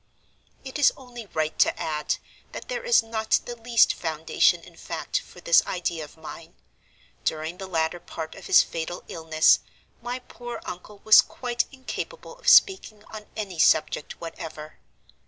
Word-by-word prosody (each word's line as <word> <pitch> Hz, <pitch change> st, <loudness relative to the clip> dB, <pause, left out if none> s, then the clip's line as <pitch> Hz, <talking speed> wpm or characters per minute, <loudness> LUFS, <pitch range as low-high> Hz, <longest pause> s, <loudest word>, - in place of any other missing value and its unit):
"It 265 Hz, +2 st, -6 dB
is 285 Hz, -, +6 dB
only 240 Hz, -4 st, -10 dB
right 155 Hz, -3 st, -2 dB
to -, -, +3 dB
add 150 Hz, -1 st, -1 dB, 0.4 s
that -, -, -8 dB
there -, -, -3 dB
is 485 Hz, -, +4 dB
not 220 Hz, -1 st, 0 dB
the 240 Hz, -, -6 dB
least 230 Hz, 0 st, +3 dB
foundation 160 Hz, -1 st, +1 dB
in -, -, -15 dB
fact -, -, -3 dB
for -, -, -15 dB
this 170 Hz, -, +5 dB
idea 175 Hz, -3 st, -2 dB
of 150 Hz, -, -13 dB
mine. 160 Hz, +1 st, -11 dB, 0.7 s
During 160 Hz, +3 st, -2 dB
the 190 Hz, -, -6 dB
latter 165 Hz, -1 st, -1 dB
part 160 Hz, -1 st, -7 dB
of -, -, -11 dB
his -, -, +7 dB
fatal 165 Hz, +2 st, -5 dB
illness, 160 Hz, -1 st, +3 dB, 0.4 s
my 245 Hz, +1 st, -4 dB
poor 245 Hz, -1 st, -8 dB
uncle 200 Hz, +3 st, -9 dB
was 220 Hz, -, +9 dB
quite 240 Hz, -1 st, -2 dB
incapable 290 Hz, -, -7 dB
of -, -, +1 dB
speaking 225 Hz, -, +5 dB
on 215 Hz, -1 st, -8 dB
any 195 Hz, -6 st, -5 dB
subject 155 Hz, -1 st, +2 dB
whatever. 160 Hz, -2 st, -8 dB
190 Hz, 155 wpm, -25 LUFS, 160-240 Hz, 0.7 s, was